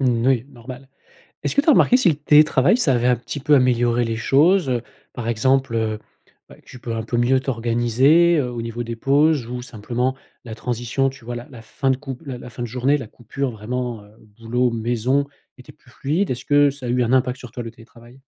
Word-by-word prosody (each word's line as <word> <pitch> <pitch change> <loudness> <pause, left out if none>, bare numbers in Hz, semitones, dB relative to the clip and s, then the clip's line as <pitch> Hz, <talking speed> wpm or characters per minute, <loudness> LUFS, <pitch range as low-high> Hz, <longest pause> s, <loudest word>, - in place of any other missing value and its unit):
Mmh, 120 -3 +1
oui. 130 -2 +2
Normal. 130 +1 -11 0.6
Est-ce - - -2
que 285 - +4
tu - - -14
as - - +9
remarqué 250 - +5
si 255 -8 +3
le 155 - +1
télétravail 150 - +4
ça 160 - +2
avait 120 0 +1
un 125 - +4
petit 125 +4 -7
peu 145 +2 +3
amélioré 120 -2 +2
les 115 0 -2
choses, 150 +8 +3
heu? 120 -2 0 0.3
Par 120 -2 -6
exemple, 130 +2 +1
heu, 110 -1 -1 0.5
heu, - - -12
tu 125 - -13
peux 115 -1 -5
un 110 - -3
peu 120 +2 -3
mieux 125 +2 +3
t'organiser, 130 +7 +2
heu, 125 -3 -1
au 120 -1 -5
niveau 115 +1 -5
des 115 0 -5
pauses 140 +1 +2
ou 125 0 -5
simplement 120 +2 -3 0.3
la 115 -3 -8
transition. 120 +3 -1
Tu 130 -3 -14
vois? 120 0 -5
La 120 +1 -8
la 120 -4 -12
fin 135 +4 -2
de 130 - 0
cou 135 -2 -7
la 130 -3 -6
la 125 - -10
fin 120 - -9
de - - -3
journée. 130 +5 +1
La 130 - -8
coupure 125 +4 -5
vraiment, 120 +1 -5
heu, 105 - -19 0.3
boulot, 120 +2 0
maison, 120 +4 0 0.3
était 125 - -14
plus 120 - -24
fluide, 155 +9 -1
est-ce 125 - -5
que 145 0 +4
ça 135 -3 -8
a - - -3
eu 125 +1 +1
un 120 +2 0
impact 130 0 +1
sur 125 -3 -11
toi 120 - -6
le 115 - -7
télétravail? 120 +2 -17
125 Hz, 230 wpm, -21 LUFS, 120-135 Hz, 0.6 s, as